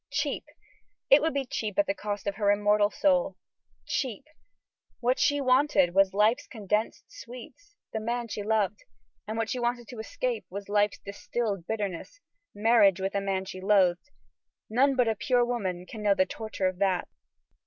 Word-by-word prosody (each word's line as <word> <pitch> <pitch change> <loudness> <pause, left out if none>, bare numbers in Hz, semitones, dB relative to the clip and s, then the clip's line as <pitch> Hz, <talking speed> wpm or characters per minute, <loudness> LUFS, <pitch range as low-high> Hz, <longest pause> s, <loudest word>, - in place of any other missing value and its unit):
Cheap? - - -2 0.7
It 275 - +8
would 320 -2 0
be 275 -1 0
cheap 215 -4 -4
at 305 - +4
the 295 - 0
cost 205 -7 -5
of 200 -1 -2
her 205 -2 +2
immortal 205 0 +3
soul. 275 +2 +1 0.5
Cheap? 245 -7 -3 0.7
What 250 +2 +1
she 290 0 +3
wanted 255 -8 +3
was 195 0 +4
life's 210 +5 +2
condensed 210 -1 -2
sweets 255 - -12 0.2
the 220 - -1
man 235 +2 -2
she 210 - -5
loved; 210 -1 0 0.4
and 220 +1 -4
what 225 -1 -1
she 255 - -2
wanted 240 -1 -2
to 245 - -8
escape - - -3
was 200 +2 -7
life's 205 -2 +2
distilled 200 -2 -4
bitterness 210 - -4 0.4
marriage 205 -3 +4
with 190 +1 -2
a 200 - 0
man 190 -1 -2
she 185 0 -8
loathed. 190 +3 +2 0.6
None 270 +4 +3
but 250 -2 +3
a 225 - +2
pure 240 +3 +1
woman 190 -7 -3
can 220 +2 -9
know 205 -1 +3
the 185 - +3
torture 215 -1 -4
of 185 0 -4
that. 190 -3 +1
215 Hz, 175 wpm, -28 LUFS, 200-245 Hz, 0.7 s, It